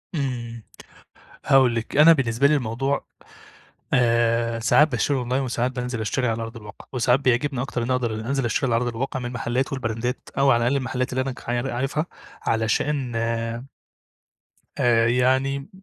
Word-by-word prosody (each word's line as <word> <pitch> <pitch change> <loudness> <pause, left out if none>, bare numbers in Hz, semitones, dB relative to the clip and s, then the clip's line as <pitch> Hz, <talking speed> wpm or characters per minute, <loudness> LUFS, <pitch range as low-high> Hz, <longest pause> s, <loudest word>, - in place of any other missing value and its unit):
إمم، 120 -5 -4 0.8
هاقول 130 -3 +4
لِك، 115 +3 -3
أنا 160 +3 +8
بالنسبة 130 -2 +2
لي 150 - +3
الموضوع 135 +2 -1 0.9
آآ، 115 -1 +2
ساعات 150 +6 +4
باشتري 135 +1 0
أونلاين 125 +2 -1
وساعات 125 0 -1
بانزِل 125 -2 -4
اشتري 125 +4 -1
على 115 0 -2
أرض 115 +1 -7
الواقع 105 -2 -11
وساعات 125 +1 +2
بيعجبني 130 +1 +1
أكتر 125 -3 -3
إنّي 125 +2 -1
اقدر 120 -3 0
إن 110 - -4
انزِل 135 +1 -1
اشتري 120 +3 0
اللي 120 -3 +1
على 115 - +1
أرض 120 -1 -3
الواقع، 130 +2 -3
من 120 0 -5
محلات 125 +3 -2
والبراندات 125 -1 -3
أو 135 0 +4
على 120 -2 +3
الأقل 125 +4 +2
المحلات 130 -1 -2
اللي 130 - 0
أنا 135 0 -3
ك - - -14
يعني 120 +2 -1
عارفها 135 +6 -2 0.4
عشان 120 +4 0
آآ 115 +1 -2 1.1
آآ، 115 -2 +3
يعني 130 +4 +1
125 Hz, 170 wpm, -23 LUFS, 115-135 Hz, 1.1 s, أنا